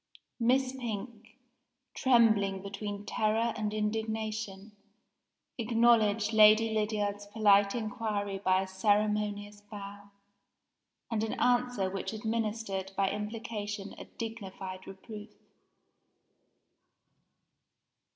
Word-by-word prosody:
Miss 255 +2 +3
Pink, 235 -2 -6 0.6
trembling 215 -6 +3
between 200 +1 -5
terror 220 +2 +1
and 215 -2 -2
indignation, 215 -1 -3 0.9
acknowledged 225 -2 +3
Lady 215 +1 +6
Lydiard's 205 -1 -1
polite 205 -1 +4
inquiry 210 -3 -2
by 190 -1 +2
a - - -7
ceremonious 205 +1 0
bow, 205 -1 -10 1.0
and 220 -1 0
an 220 - -3
answer 245 -5 +2
which 195 +3 -4
administered 215 -3 -2
by 195 -1 +2
implication 210 -1 -5
a - - -8
dignified 195 -5 -7
reproof. 210 +2 -9
210 Hz, 85 wpm, -31 LUFS, 200-225 Hz, 1.0 s, Lady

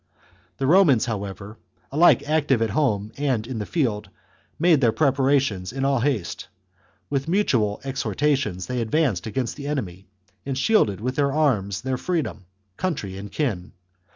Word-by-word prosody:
The 135 - -1
Romans, 150 - +5
however, 100 -1 -6 0.3
alike 155 0 +4
active 150 -5 +2
at 110 - -1
home 110 -5 0
and 130 -6 0
in 120 -2 -5
the 105 - -4
field, 115 - -1 0.5
made 165 -3 +4
their 120 -3 +4
preparations 135 -9 +1
in 135 +2 -2
all 135 -2 +2
haste. 120 -9 -2 0.6
With 135 0 -1
mutual 125 - +1
exhorta 140 +2 0
tions 95 -10 -3
they 125 +3 -2
advanced 115 - 0
against 125 +3 -3
the 140 -1 -6
enemy, 95 -11 -4 0.4
and 135 -1 -3
shielded 130 - +2
with 125 +3 -3
their 140 -1 +2
arms 105 -11 +1
their 130 +1 -2
freedom, 155 - -3 0.3
country, 130 - -3
and 100 +1 -8
kin. 105 - -2
130 Hz, 155 wpm, -23 LUFS, 105-145 Hz, 0.6 s, Romans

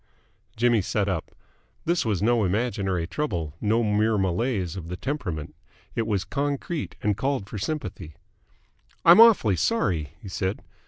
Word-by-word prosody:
Jimmy 120 -1 +3
sat 100 +2 -1
up. 95 -5 -2 0.6
This 170 +1 +1
was 105 -3 0
no 120 0 +3
imaginary 95 -3 0
trouble, 85 - -3
no 110 +3 +2
mere 105 +1 +2
malaise 95 -1 -1
of 90 -4 -7
the 90 +1 -5
temperament. 90 - -4 0.4
It 115 - -1
was 100 -3 0
concrete, 145 - -3
and 105 -1 +2
called 135 -4 -1
for 105 - -6
sympathy. 95 - -5 0.9
"I'm 175 +6 +9
awfully 205 - +6
sorry," 85 - 0
he - - -11
said. 95 +1 -3
105 Hz, 145 wpm, -25 LUFS, 90-125 Hz, 0.9 s, I'm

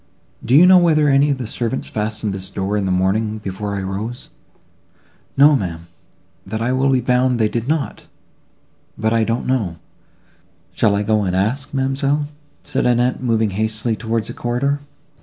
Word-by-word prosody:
"Do 120 +3 +2
you 165 +5 +8
know 185 0 +8
whether 155 -4 +3
any 140 +1 +4
of 140 - 0
the 125 - -5
servants 120 +3 -3
fastened 105 -1 -3
this 95 -1 -6
door 95 +1 -2
in 100 -2 0
the - - 0
morning, 105 +4 0
before 100 0 -5
I 100 - -3
rose?" 105 +6 -5 1.1
"No, 145 +2 +7
ma'am, 85 -8 -4 0.6
that 110 +3 -4
I 115 +2 0
will 130 +1 +2
be 130 -2 +2
bound 125 +1 +2
they 110 -2 +2
did 115 +2 -3
not; 155 0 -2 0.9
but 110 +1 0
I 115 -1 +3
don't 115 +2 -1
know: 110 -10 -1 1.0
shall 105 0 +2
I 100 - 0
go 110 0 +1
and 90 -2 -1
ask, 115 +9 -1
ma'amselle?" 140 +2 0 0.4
said - - -1
Annette, 125 +1 +1
moving 115 -4 +1
hastily 110 +3 -1
towards 115 -1 -2
the 120 - -6
corridor. 125 +5 -1
115 Hz, 175 wpm, -19 LUFS, 105-130 Hz, 1.1 s, you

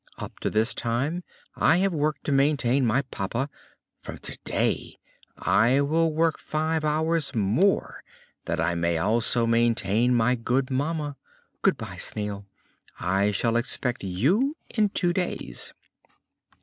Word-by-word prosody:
Up - - -8
to - - -1
this 110 +4 +1
time 135 +9 -1 0.3
I 165 - +4
have 190 0 +1
worked 150 -2 -1
to - - -2
maintain 135 -2 +2
my 125 +5 +2
papa; 125 +3 -3 0.5
from - - -8
today - - -2 0.4
I 120 +6 +3
will 160 +3 +2
work 160 +1 +1
five 155 +1 -1
hours 155 -1 0
more 115 - +1 0.4
that 85 0 -2
I 85 +2 +1
may 85 0 0
also 115 +6 +2
maintain 115 0 +2
my 120 +1 +3
good 125 +2 -1
mamma. 145 +1 -2 0.4
Good - - +3
bye, - - -7
Snail, 100 -1 -4 0.5
I 95 +3 +1
shall 115 +3 0
expect 125 0 -1
you 170 - +1
in 215 -3 +2
two 175 -3 +1
days." 180 - -3
130 Hz, 135 wpm, -26 LUFS, 110-155 Hz, 0.5 s, I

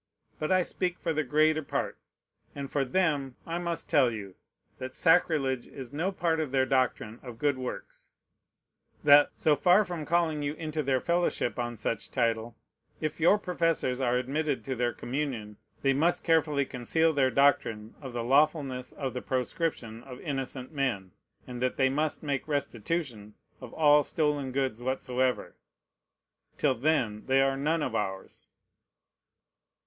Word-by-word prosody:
But 155 - -2
I 185 -1 +4
speak 180 0 -2
for 165 - -2
the 155 0 0
greater 155 +3 +3
part; 140 - -3 0.6
and 140 -1 -6
for 140 - +1
them, 140 -3 0
I 165 +1 -3
must 170 -1 -3
tell 135 -5 +4
you, 100 -4 -7 0.5
that 130 0 -6
sacrilege 155 -7 +2
is 130 -1 -9
no 170 +6 -1
part 170 -4 0
of 155 -3 -1
their 130 0 +2
doctrine 130 -4 0
of 120 -3 -9
good 145 +2 +1
works; 125 - -7 0.9
that, 145 0 +7
so 155 -2 +3
far 180 +8 +4
from 170 -4 -5
calling 165 -3 +1
you 145 +1 -2
into 155 -1 -3
their 130 -2 +1
fellowship 170 -9 0
on 120 -1 -3
such 110 0 -3
title, 115 -2 -1 0.4
if 155 +1 -3
your 175 +6 +5
professors 165 -9 0
are 125 -1 +2
admitted 140 +3 -1
to 135 -2 -2
their 120 0 0
communion, 120 -7 -4 0.3
they 135 -1 +4
must 165 +6 +2
carefully 155 -4 +2
conceal 160 +7 +1
their 135 -3 +3
doctrine 115 -6 +2
of 135 -3 -7
the 120 -1 -3
lawfulness 135 -1 +1
of 135 -3 -4
the 125 - -4
proscription 125 -3 -2
of 125 0 -10
innocent 135 -3 -4
men, 120 - -2 0.3
and 125 -1 -7
that 130 0 0
they 130 -1 +3
must 150 +4 -1
make 140 -2 -2
restitution 135 -5 -3 0.3
of - - -9
all 150 -1 +5
stolen 145 -3 -1
goods 130 -3 -1
whatsoever. 130 0 -1 1.0
Till 145 -3 +2
then 120 -5 0
they 135 0 +4
are 135 0 +3
none 150 +3 0
of 125 - -2
ours. 95 -3 -4
140 Hz, 155 wpm, -29 LUFS, 125-155 Hz, 1.0 s, that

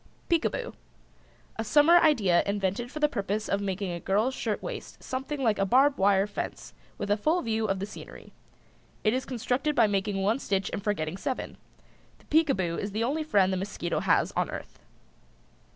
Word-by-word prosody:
PEEKABOO. 345 +8 0 0.8
A 225 - -1
summer 295 +9 +6
idea 215 - +4
invented 200 +4 -1
for 305 - -6
the 300 - +4
purpose 210 -4 -2
of 200 - 0
making 195 -1 -2
a 170 - -4
girl's 210 +9 +1
shirtwaist 220 -5 -5
something 265 +2 -4
like 220 -4 +2
a - - +3
barb 270 +6 +4
wire 195 0 +4
fence 210 - -6 0.2
with 205 - -3
a - - +5
full 315 +11 +1
view 220 -2 0
of 195 -1 0
the 190 - -3
scenery. 210 - -11 0.7
It 215 - +3
is 260 +1 -1
constructed 255 +4 -1
by 235 - +5
making 195 -1 -1
one 220 +6 +2
stitch 195 -6 -1
and 200 - -3
forgetting 180 -5 -2
seven. 260 +6 -4 0.6
The - - -24
Peekaboo 235 - +1
is 200 -1 -4
the 220 +2 0
only 285 +7 0
friend 195 -10 +3
the - - 0
mosquito 200 +3 -3
has - - +2
on - - -1
earth. - - -8
210 Hz, 180 wpm, -28 LUFS, 195-265 Hz, 0.8 s, summer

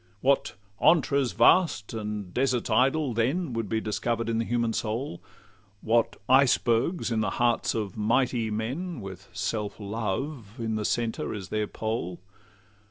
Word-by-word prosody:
What 140 +1 +2 0.3
'antres 140 -6 +3
vast 160 - +4
and 105 -4 -4
deserts 125 -3 0
idle' 135 +4 +3
then 130 +7 0
Would 115 -3 -2
be 110 - +1
discover'd 115 +2 -2
in 115 0 0
the 115 - 0
human 115 -1 0
soul! 110 -2 -3 0.6
What 115 +1 +2
icebergs 130 +3 +3
in 115 - +1
the 105 - 0
hearts 120 -1 +2
of 105 -4 -3
mighty 115 +1 +1
men, 130 +10 -3
With 95 -1 -9
self 105 0 -3
love 110 +3 -3
in 115 -2 -2
the 110 -1 -2
centre 115 -1 -1
as 95 -3 -7
their 105 -1 -1
pole! 110 -6 -3
115 Hz, 145 wpm, -27 LUFS, 105-130 Hz, 0.6 s, vast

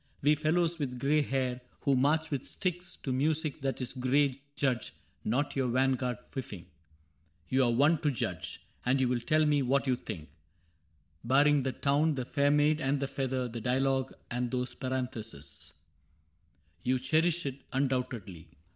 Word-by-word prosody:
We 150 +2 +6
fellows 165 +2 +1
with 125 -4 -2
gray 145 +4 +3
hair 130 -3 -1 0.2
Who 140 - +3
march 155 +5 +2
with 140 -2 -2
sticks 180 -1 -3
to 130 - -1
music 150 +2 0
that 135 0 -1
is 125 - -3
gray 135 +1 +1
Judge 130 -4 -1 0.3
not 135 +6 0
your 135 -2 +1
vanguard 130 0 +1
fifing. 105 -10 -6 0.8
You 130 0 +3
are 120 - +3
one 145 +7 +4
To 150 - +1
judge; 135 - -3 0.2
and 130 +2 +2
you 130 - +3
will 125 0 +1
tell 155 +6 +2
me 145 -1 +3
what 135 +2 +2
you 130 -2 +2
think: 90 -10 -7 0.5
— 80 0 -40
Barring 140 +4 +4
the 130 0 -1
Town, 145 +5 +2
the 130 -2 -3
Fair 140 +2 +2
Maid, 150 +1 +3
and 135 +1 +1
the 140 - -1
Feather, 130 -2 -2
The 115 -1 -6
dialogue 130 +2 +1 0.2
and 125 0 -1
those 125 0 -2
parentheses. 125 - -4
so 70 +2 -9
CAPTAIN 75 0 -23 1.0
CRAIG - - -12
You 130 +1 +3
cherish 160 +5 +2
it, 140 0 -4
undoubtedly. 125 - -2
130 Hz, 175 wpm, -31 LUFS, 125-145 Hz, 1.0 s, We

